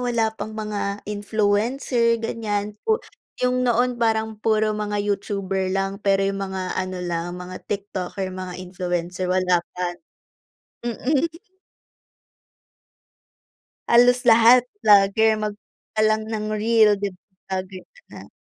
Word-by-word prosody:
wala 235 -3 0
pang 220 0 -7
mga 205 -1 -3
influencer 220 +4 +1
ganyan. 210 -2 -2
Pu 440 0 +2 0.5
yung 250 0 +2
noon 245 0 +1
parang 220 -1 0
puro 215 -1 +2
mga 210 -1 -2
Youtuber 195 -2 -1
lang, 195 +1 -2
pero 195 -1 +2
yung 195 0 -1
mga 190 -1 -3
ano 185 0 -3
lang, 175 +1 -3
mga 180 0 -8
TikToker, 195 -2 -4
mga 185 -1 -6
influencer, 180 0 -3
wala 180 -1 +2 0.2
pa. 180 -1 -1 0.9
Mm. 265 +6 0 2.6
Halos 245 +1 +6
lahat 235 +2 +7 0.2
vlogger 205 +2 +5
mag 210 -1 -2 0.4
ka - - +2
lang 215 0 0
ng 215 -1 -3
reel 220 -1 +5
'di 205 - 0 0.4
ba 190 - -1
ganyan 185 -1 -12 0.2
na. - - -11
205 Hz, 120 wpm, -23 LUFS, 190-225 Hz, 2.6 s, lahat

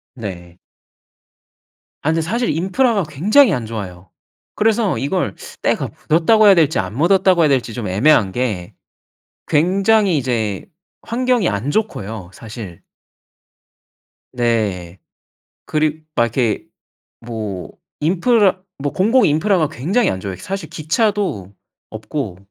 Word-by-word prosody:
네. 90 -6 -8 1.4
아 150 - -1
근데 165 0 +1
사실 230 +9 -1
인프라가 195 - +1
굉장히 205 - +4
안 120 -5 -2
좋아요. 95 -5 -7 0.4
그래서 215 - +1
이걸 140 - -1 0.3
때가 - - 0 0.2
묻었다고 210 +7 +4
해야 200 - +8
될지 160 -3 +2
안 95 +2 -3
묻었다고 180 +2 +3
해야 155 - +4
될지 125 -5 0
좀 115 -5 -4
애매한 100 0 +3
게 110 -8 -3 0.7
굉장히 190 +3 +3
이제 115 -7 -2 0.4
환경이 245 -3 0
안 105 +6 -2
좋고요 110 - -3
사실. 105 -6 -10 1.5
네. 105 -8 -1 0.7
그리 155 0 -1
막 120 - +3
이렇게 115 -1 -1 0.6
뭐 110 -6 -6 0.3
인프라 190 +3 +2 0.2
뭐 140 0 -3
공공 225 +7 +3
인프라가 160 +1 +2
굉장히 180 - 0
안 95 - -2
좋아요. 95 -1 -5
사실 190 - -6
기차도 160 - -1 0.4
없고 110 - -5
150 Hz, 245 characters per minute, -18 LUFS, -, 1.5 s, 해야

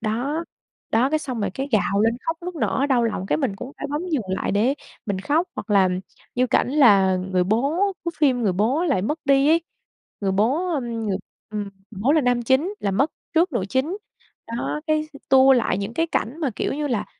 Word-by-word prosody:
đó, 255 +9 -2 0.5
đó, 240 +5 +3
cái 310 - +2
xong 255 -6 -4
rồi 200 -2 -1
cái 270 +1 -3
gào 200 -2 +2
lên 225 +1 +2
khóc 325 0 0
nức 360 +1 -5
nở, 280 -2 0
đau 250 -4 +3
lòng, 195 -4 -2
cái 150 - +1
mình 195 - -1
cũng 260 - -8
phải - - -3
bấm 295 +3 -2
dừng 295 -7 +1
lại 190 - -1
để 225 +7 +2 0.3
mình 200 -3 -1
khóc. 305 - +1
Hoặc - - -6
là 195 -2 +5 0.5
như 255 +1 +2
cảnh - - +2
là 200 -10 +5
người 185 0 0
bố 280 - +1
của 340 - -1
phim, 265 -5 +3
người 200 -4 +2
bố 235 - +1
lại 275 - +1
mất 300 +10 -1
đi 275 0 +4
ấy, 330 +2 +5 0.6
người 195 -2 0
bố, 245 - +1
ừm, 275 -5 -1 0.2
ng - - -1 0.4
ừm, 210 -1 -2 0.3
người 200 -4 -9
bố 265 +6 +4
là 315 - +4
nam 245 -2 +1
chính 270 - +1
là 200 - 0
mất 265 +11 +1 0.2
trước 335 +1 +3
nữ 235 -7 0
chính. 270 - 0 0.5
Đó, 235 +6 -3
cái, 310 -1 0
ừ, 280 - -11
tua 265 0 +7
lại 235 -7 +2
những 200 +4 -4
cái 330 - +1
cảnh 280 -3 -2
mà, 285 - 0
kiểu - - -1
như 295 +1 -2
là, 240 -7 -1
255 Hz, 225 wpm, -23 LUFS, 210-300 Hz, 0.6 s, tua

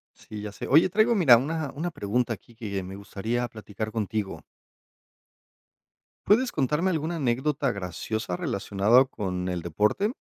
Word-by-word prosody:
Sí, 105 -1 -9
ya 105 -1 -5
sé. - - -7
Oye, 160 +7 +5
traigo, 215 +5 +3
mira, 140 - +7
una 150 +3 -2
una 175 +4 -3
pregunta, 115 -1 -1
aquí, 115 +2 -14
que 100 -4 -4
me 95 +1 -8
gustaría 110 +5 -3
platicar 110 -1 -6
contigo. 105 -6 -3 1.8
¿Puedes 245 +5 +4
contarme 150 +6 +1
alguna 160 0 -2
anécdota 135 -1 0
graciosa 95 +1 -4
relacionada 100 +7 +3
con 90 -7 -4
el 90 -2 -2
deporte? 105 - +1
115 Hz, 140 wpm, -26 LUFS, 100-150 Hz, 1.8 s, mira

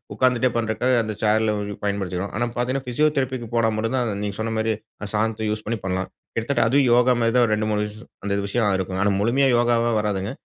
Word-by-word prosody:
உட்கார்ந்துட்டே 130 -1 +3
பண்றக்காக, 115 +3 0
அந்த 110 0 -3
சேர்ல 110 0 +3 0.3
பயன்படுத்திக்கிறோம். 100 -2 -2
ஆனா, 120 - 0
பார்த்தீங்கன்னா 130 +3 -1
ஃபிசியோதெரபிக்கு 130 -3 0
போனா 115 -1 +3
மட்டும் 115 +4 -1
தான், 125 - +1
அந்த 105 - -2
நீங்க 100 -1 -4
சொன்னமாரி 110 0 0 0.3
அந்த 105 - -6
சாதனத்த 110 0 0
யூஸ் 105 0 -3
பண்ணி 115 0 -1
பண்ணலாம். 95 0 -2 0.3
கிட்டத்தட்ட 120 +2 +1
அதுவும் 135 +1 +3
யோகாமாரி 120 -1 +3
தான் 125 -1 +5
ஒரு 110 - +1
ரெண்டு 110 0 -1
மூணு 105 0 +1
விஷயம் 110 +3 -13
அந்த 100 -1 -1
விஷயம் 105 -1 +1
இருக்கும். 95 0 -3
ஆனா, 100 - +3
முழுமையா 130 +6 +3
யோகாவா 120 0 +2
வராதுங்க. 100 -1 -2
110 Hz, 195 wpm, -23 LUFS, 105-120 Hz, 0.3 s, தான்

